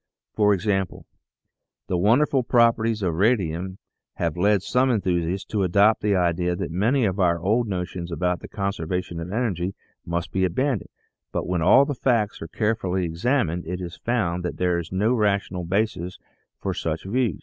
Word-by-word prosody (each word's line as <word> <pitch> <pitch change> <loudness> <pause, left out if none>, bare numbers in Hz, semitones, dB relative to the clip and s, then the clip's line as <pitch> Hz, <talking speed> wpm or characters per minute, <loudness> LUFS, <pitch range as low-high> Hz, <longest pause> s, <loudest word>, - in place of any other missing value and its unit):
For 105 -1 +3
example, 95 -1 -1 0.8
the 90 - -2
wonderful 125 +9 +3
properties 115 -3 +2
of 90 -3 +1
radium 95 -2 0 0.4
have 85 -2 -1
led 100 +2 +2
some 130 +4 +2
enthusiasts 95 -4 0
to 105 - 0
adopt 100 +4 +4
the 105 -1 +2
idea 90 0 +1
that 85 - -4
many 115 +9 +2
of 95 0 -1
our 85 -2 +3
old 110 +7 +1
notions 90 -2 -4
about 90 +1 0
the - - -9
conservation 90 -3 -3
of 85 +2 -6
energy 100 -5 -1 0.3
must 85 0 -3
be 95 - 0
abandoned, 120 +6 0 0.4
but - - -2
when 90 -1 -1
all 130 - +6
the 145 - -2
facts 115 -5 0
are 80 - -5
carefully 95 -3 -1
examined 90 - 0
it 90 +1 -3
is 90 -1 -6
found 90 -8 -1
that 90 - -4
there 90 -1 +1
is 85 -1 -7
no 105 +6 +2
rational 100 -5 0
basis 90 -1 -1 0.4
for - - -2
such 80 0 -3
views. 115 -1 0
95 Hz, 170 wpm, -24 LUFS, 90-110 Hz, 0.8 s, all